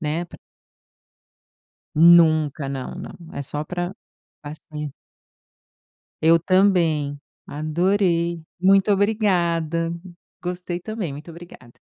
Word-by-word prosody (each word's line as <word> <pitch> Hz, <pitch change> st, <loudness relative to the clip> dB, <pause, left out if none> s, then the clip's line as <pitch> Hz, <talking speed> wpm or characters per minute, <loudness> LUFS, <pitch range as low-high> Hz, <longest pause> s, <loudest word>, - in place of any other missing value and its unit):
né, 160 Hz, +2 st, -2 dB
para 170 Hz, -, -14 dB, 1.6 s
Nunca, 155 Hz, -4 st, +5 dB
não, 135 Hz, +4 st, -5 dB
não. 180 Hz, -, -8 dB, 0.2 s
É -, -, -4 dB
só 145 Hz, +2 st, -4 dB
para 175 Hz, +4 st, -4 dB, 0.8 s
sair. 150 Hz, -2 st, -5 dB, 1.3 s
Eu 165 Hz, +1 st, +6 dB
também. 170 Hz, -6 st, +2 dB, 0.3 s
Adorei. 170 Hz, +2 st, 0 dB, 0.2 s
Muito 195 Hz, +3 st, +4 dB
obrigada. 170 Hz, -6 st, +1 dB, 0.5 s
Gostei 180 Hz, 0 st, -4 dB
também, 215 Hz, -4 st, -5 dB
muito 145 Hz, +4 st, -9 dB
obrigada. 170 Hz, -7 st, -13 dB
170 Hz, 90 wpm, -22 LUFS, 155-180 Hz, 1.6 s, Eu